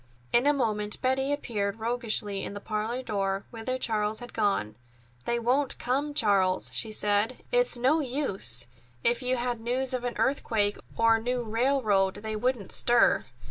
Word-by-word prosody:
In 245 +4 +4
a - - +6
moment 210 -6 0
Betty 265 +2 +1
appeared 210 -8 -2
roguishly 225 -3 0
in 200 - -6
the - - -5
parlor 220 +4 -3
door, 195 -3 -2
whither 245 +2 -3
Charles 215 -3 -1
had 245 -1 -10
gone. 195 - 0 0.5
"They 235 - 0
won't 255 +4 +1
come, 285 +4 -1
Charles," 195 -6 +2
she 220 - 0
said. 210 +3 0
"It's - - +3
no 265 +7 +3
use. 200 - +1 0.4
If 240 +1 +2
you 255 0 0
had 240 -1 -2
news 250 +3 -2
of 250 -1 -2
an 245 -1 -3
earthquake 215 -6 0 0.2
or 230 0 +4
a - - -6
new 245 +1 -1
railroad, 220 -4 +1
they 220 0 -4
wouldn't 240 -2 -1
stir. 240 -1 +4
230 Hz, 165 wpm, -28 LUFS, 210-255 Hz, 0.5 s, a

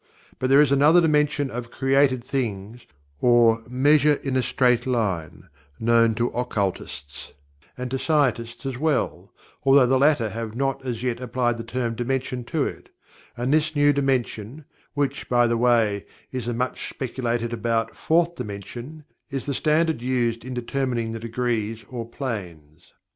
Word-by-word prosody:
But 130 - 0
there 135 +2 +7
is 145 -2 +3
another 150 +5 +6
dimension 150 -4 +2
of 120 0 -5
"created 135 -1 +2
things" 115 -3 -4 0.3
or 120 -2 +4
"measure 145 +4 +4
in 135 -2 -4
a 130 - +3
straight 125 0 +2
line," 100 -11 -2 0.4
known 115 0 +3
to 120 +2 0
occultists, 100 - -4 0.4
and 125 0 -5
to 135 - -1
scientists 130 -5 0
as 130 -2 -4
well, 155 -3 -1 0.3
although 135 -1 +6
the 130 +1 +2
latter 140 -6 +3
have 115 0 -5
not 135 +1 -1
as 120 -2 -4
yet 120 -2 -1
applied 120 -1 -1
the - - -4
term 120 0 -2
"dimension" 125 +1 -2
to 155 +1 0
it - - -7 0.5
and 125 +4 0
this 155 0 +1
new 145 0 +4
dimension, 135 -1 -2 0.3
which, 145 -1 -2
by 120 -1 +4
the 115 0 +1
way, 115 -4 +2 0.2
is 125 -3 -4
the 120 - -1
much 125 +2 -3
speculated 120 -2 -3
about 115 0 -1
"Fourth 170 +1 +2
Dimension," 125 - -8 0.3
is 135 -2 -4
the 140 - -2
standard 155 -1 +1
used 120 -2 0
in 130 0 -6
determining 120 -2 -2
the 115 - -5
degrees 115 -1 -2
or 115 -2 -5
"planes." 90 - -7
125 Hz, 155 wpm, -24 LUFS, 115-135 Hz, 0.5 s, there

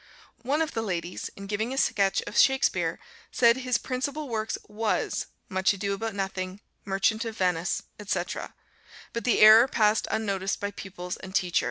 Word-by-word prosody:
One 285 +6 +1
of 315 - -4
the 225 - -2
ladies, 180 -4 -4
in 195 - -8
giving 215 +4 -2
a - - -7
sketch 195 -6 +2
of - - -7
Shakspeare, 265 0 +3 0.3
said 235 0 +4
"his 250 -1 0
principal 275 +3 -3
works 220 -1 -2
was 215 +1 -1 0.2
'Much 190 0 +2
Ado 200 0 -2
About 220 +1 -4
Nothing,' 190 -1 -3 0.3
'Merchant 200 +3 +1
of 225 -1 -6
Venice,' 180 -3 0 0.2
etc.;" 185 -3 -3 0.6
but 235 - -4
the 245 - +3
error 220 +3 +9
passed 215 -4 +2
unnoticed 195 -3 -1
by 205 0 -3
pupils 180 -3 -7
and 190 0 -9
teacher. 180 -3 +2
210 Hz, 165 wpm, -27 LUFS, 190-230 Hz, 0.6 s, error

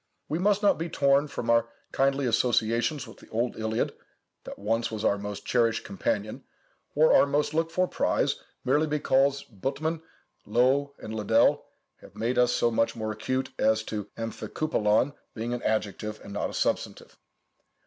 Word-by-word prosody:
We 155 - -2
must 205 +2 +2
not 205 - +4
be 165 +1 -3
torn 140 0 +3
from 120 -4 -5
our 115 0 +3 0.2
kindly 135 0 +1
associations 120 +3 +1
with - - -13
the - - -17
old 120 +2 -1
Iliad, 110 0 -1 0.5
that - - -8
once 115 +3 0
was 110 -1 -4
our 100 - +2
most 100 0 -6
cherished 115 -2 +1
companion, 240 +9 -3 0.5
or - - +5
our - - +6
most 145 +1 0
looked 165 +1 0
for 185 +1 +1
prize, - - 0 0.3
merely 150 +5 +3
because 140 -2 +2
Buttmann, 145 - -3 0.5
Loewe, 130 +6 +2
and 110 - -8
Liddell 105 -2 +2 0.3
have - - -17
made 120 +3 0
us 125 0 +4
so 120 - +2
much 115 0 +1
more 110 -1 -3
accurate 130 +5 -2
as 110 0 +3
to 105 -2 -4
ἀμφικύπελλον 115 +1 0 0.2
being 115 +1 -3
an 125 - -3
adjective, 105 0 -2
and 100 - -9
not 105 - -2
a - - -9
substantive. - - -2
125 Hz, 165 wpm, -27 LUFS, 110-145 Hz, 0.5 s, our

